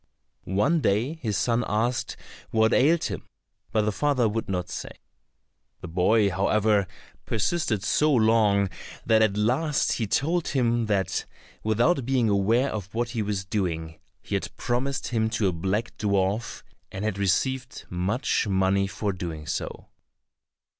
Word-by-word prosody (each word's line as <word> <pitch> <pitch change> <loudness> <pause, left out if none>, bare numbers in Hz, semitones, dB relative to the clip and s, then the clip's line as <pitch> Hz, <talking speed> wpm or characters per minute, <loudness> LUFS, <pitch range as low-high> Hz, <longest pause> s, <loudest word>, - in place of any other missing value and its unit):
One 105 - +2
day 115 +6 +1
his 105 -6 -1
son 120 0 +1
asked 115 +4 -1 0.3
what 110 0 +3
ailed 155 +6 +4
him, - - -3 0.5
but 110 - +2
the 105 - +1
father 130 0 +1
would 110 0 -3
not 90 -2 -2
say. 90 - -6 0.9
The - - -7
boy, 100 +5 +3
however, 100 +2 +2 0.4
persisted 115 - 0
so 150 +8 +2
long, 110 -5 +3 0.4
that 110 -1 +4
at 105 -2 +2
last 135 +8 +1
he 110 - -1
told 165 - 0
him 120 -4 +1
that 100 -3 0 0.4
without 120 +8 +2
being 125 -2 +1
aware 110 +7 +2
of 100 -3 -5
what 120 0 0
he 115 -2 -2
was 100 -2 -2
doing, 85 -5 -3 0.2
he - - -7
had - - -1
promised 130 +3 -2
him 110 -2 +1
to 105 - +2
a - - -2
black 95 +7 -2
dwarf, 100 +2 0 0.3
and 95 +2 -4
had 105 -2 -2
received 130 +7 -1
much 100 +7 0
money 95 0 +2
for 100 0 -2
doing 85 -4 -6
so. - - -4
110 Hz, 145 wpm, -26 LUFS, 100-120 Hz, 0.9 s, ailed